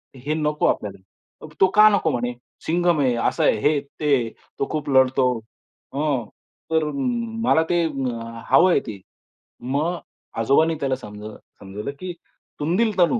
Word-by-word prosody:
हे 135 +4 -3
नको 150 -1 0
आपल्याला." 100 +8 -5
तो 190 - +8
"का 215 0 +9
नको 200 -6 +2
म्हणे? 125 -1 -2 0.3
सिंघम 175 -1 +2
आहे, 130 -3 +2
असं 115 - 0
आहे. - - +4
हे 145 - +3
आहे, 150 - +1 0.2
ते 150 -2 +3
आहे, 120 -3 -1 0.3
तो 140 - 0
खूप 150 -1 -3
लढतो. 130 -1 +4 0.6
ह, 140 -4 0 0.5
तर 160 -1 +3
मला 235 -8 0
ते, 175 -1 +2 0.7
हवंय 175 +7 +6
ते." 105 -3 -6 0.6
मग 145 +8 -1 0.4
आजोबांनी 150 +8 +3
त्याला 135 -2 0
समज 105 -4 -10 0.4
समजावलं, 105 +5 -6
की 185 -1 -5 0.5
"तुंदिल 190 +7 +1
तनू. 180 +7 +4
150 Hz, 145 wpm, -23 LUFS, 125-175 Hz, 0.7 s, का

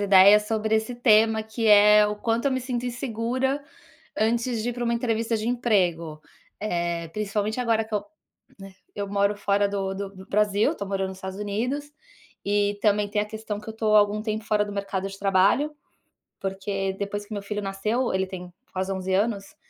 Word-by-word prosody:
ideias 200 +1 +6
sobre 220 0 0
esse 220 +3 0
tema 220 -2 +4
que 220 +1 -3
é 210 0 +7
o 210 - -3
quanto 230 +4 -1
eu - - +3
me 260 -1 0
sinto 245 -1 -3
insegura 250 +3 -2 0.6
antes 230 +1 +1
de 245 - -1
ir - - -4
pra 245 - -5
uma 235 - +1
entrevista 230 -1 0
de 215 +1 -2
emprego, 180 -10 0 0.4
eh, 170 -4 -2
principalmente 210 +4 -2
agora 225 -2 +1
que 220 0 -6
eu, 205 - -1 0.5
né, 195 0 -11 0.2
eu 200 -1 -4
moro 200 +1 +1
fora 200 0 +1
do 195 -1 -2
do 195 0 -5
do 190 -1 -13
Brasil, 210 +1 +2
tô 200 - -5
morando 195 -1 -1
nos 190 0 -8
Estados 190 0 -6
Unidos, 250 +9 -3 0.5
e 205 0 +1
também 205 -1 +2
tem 210 0 0
a - - -2
questão 215 -1 -5
que 215 - -12
eu - - -4
tô 220 -1 +1
há - - +9
algum 210 +1 +2
tempo 215 0 -3
fora 210 -1 +2
do 205 - -7
mercado 195 -1 -3
de 195 - -10
trabalho, 200 +10 +2 0.7
porque 195 0 -2
depois 205 0 -3
que 215 - -12
meu 205 -1 -4
filho 205 +1 -4
nasceu, 210 +6 -1
ele 190 0 +1
tem 180 -1 -8 0.2
quase 190 +1 -2
11 190 0 -2
anos, 200 0 -1
210 Hz, 200 wpm, -25 LUFS, 195-225 Hz, 0.7 s, há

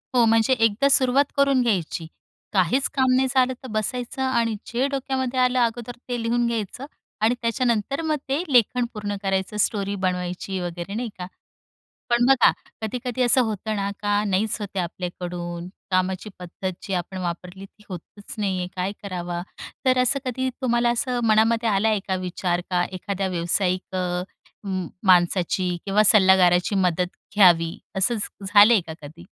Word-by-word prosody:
हो, 240 -2 +5
म्हणजे 225 +2 +3
एकदा 225 +2 +2
सुरुवात 265 +1 +4
करून 275 -2 +3
घ्यायची 180 -7 -1 0.5
काहीच 195 +8 +2
काम 260 -3 +2
नाही 265 +1 +3
झालं 260 0 +2
तर - - -7
बसायचं 245 +5 -3
आणि 235 -4 +1
जे 250 +4 0
डोक्यामध्ये 265 -2 -2
आलं, 250 0 +3
अगोदर 240 0 -1
ते 240 -1 -2
लिहून 235 +1 +1
घ्यायचं 230 +3 -4 0.4
आणि 230 +3 +3
त्याच्यानंतर 235 +3 0
मग 315 -1 0
ते 275 +4 +1
लेखन 245 +1 +4
पूर्ण 205 -2 -4
करायचं 195 +1 -1
स्टोरी 200 -1 0
बनवायची 180 +1 -2
वगैरे 175 +2 -5
नाही 235 +1 -3
का. 180 - -5 0.8
पण 240 0 +3
बघा 270 -2 +6 0.3
कधी-कधी 250 +3 -3
असं 245 +1 +4
होतं 220 -2 -2
ना 200 0 -1
का, 205 0 +1
नाहीच 200 +2 0
होते 200 -1 -5
आपल्याकडून, 175 -1 -5 0.2
कामाची 185 +2 -1
पद्धत 180 +1 -5
जी 195 - -6
आपण 180 +1 -4
वापरली 180 +2 -5
ती 210 +2 -18
होतच 195 +2 -9
नाहीये, 190 -3 -1
काय 185 +2 -2
करावं? 175 -3 -4 0.4
तर 255 0 +4
असं 255 +3 +2
कधी 260 +1 -2
तुम्हाला 240 -1 +2
असं 245 +1 -1
मनामध्ये 225 +1 +3
आला 205 +1 +2
आहे 215 -2 +1
का 190 - +1
विचार 175 0 -1
का 180 -1 +2
एखाद्या 195 +1 -3
व्यावसायिक 185 +2 -1
अ, 180 -1 -1 0.4
उम 185 -3 -3 0.2
माणसाची 180 0 +3
किंवा 200 +1 +3
सल्लागाराची 190 -2 +5
मदत 180 -1 0 0.2
घ्यावी 170 -4 +5 0.2
असं 200 +6 +2
झ 205 -1 -5
झालंय 210 +1 +7
का 160 - -6
कधी? 160 +4 -11
205 Hz, 155 wpm, -23 LUFS, 185-240 Hz, 0.8 s, झालंय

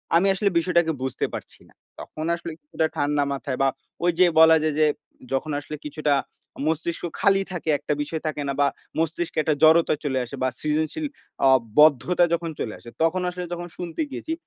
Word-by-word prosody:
আমি 175 +4 +4
আসলে 200 +1 +1
বিষয়টাকে 170 -1 +2
বুঝতে 130 -1 -1
পারছি - - -8
না। - - -23 0.3
তখন 155 - -6
আসলে 170 0 -7
কিছুটা 155 +2 -1
ঠান্ডা 145 0 +1
মাথায় 135 -1 -4
বা 135 - +4 0.4
ওই 175 - +4
যে 185 - +8
বলা 160 0 +8
যায় 155 -2 0
যে 155 - +5 0.5
যখন 150 +3 -1
আসলে 150 +1 -7
কিছুটা 150 0 0 0.5
মস্তিষ্ক 165 +1 -2 0.2
খালি 195 -1 +4
থাকে 170 -3 -4
একটা 145 +1 -2
বিষয় 155 +2 -4
থাকে 150 -1 -3
না 140 - -1
বা 140 - +5 0.3
মস্তিষ্কে 165 +1 -2
একটা 155 -1 +1
জড়তা 160 +1 +6
চলে 135 -3 0
আসে 120 - -8
বা 130 - +3
সৃজনশীল 155 - -1 0.4
অ - - +7 0.3
বদ্ধতা 155 +4 +5
যখন 170 0 -1
চলে 110 - -3
আসে 120 - -12
তখন 170 +3 +2
আসলে 180 0 -5
যখন 175 0 -5
শুনতে 175 - -4
গিয়েছি 320 - -4
160 Hz, 185 wpm, -24 LUFS, 150-170 Hz, 0.5 s, যে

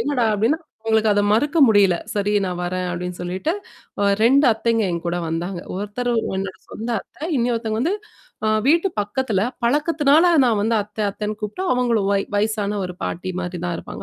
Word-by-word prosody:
"என்னடா?" 265 -5 +1
அப்படீன்னா, 235 +11 +1 0.2
அவுங்களுக்கு 220 -1 +3
அத 205 - +3
மறுக்க 290 +8 +1
முடியல. 200 -4 +5 0.2
"சரி 205 0 0
நா - - -2
வரேன்." 180 0 -2
அப்படீன்னு 180 0 -5
சொல்லிட்டு, 185 - -2 0.5
ஒ - - +2 0.2
2 275 +4 +5
அத்தைங்க 225 0 0
என் 170 0 -4
கூட 175 - -1
வந்தாங்க. 175 +2 -3 0.2
ஒருத்தர் 215 +5 -2 0.2
என்னோட 190 0 -4
சொந்த 230 +2 -5
அத்தை. 305 - -11
இன்னொருத்தைங்க 230 -2 -1
வந்து 340 +9 +1 0.5
அ - - +3 0.2
வீட்டு 335 +6 +4
பக்கத்துல. 210 -1 -1 0.2
பழக்கத்துனால 295 +5 +3
நா - - +4
வந்து 225 +2 +1
அத்தை 210 +1 -6
அத்தைன்னு 210 +1 -4
கூப்பிட்டு, 210 - -4
அவங்களும் 235 -5 +1
வய் 195 0 +1
வயசான 210 0 0
ஒரு 180 -1 -6
பாட்டி 180 +2 -3
மாரி 180 0 -4
தான் 175 - -1
இருப்பாங்க. - - -8
215 Hz, 170 wpm, -21 LUFS, 195-245 Hz, 0.5 s, முடியல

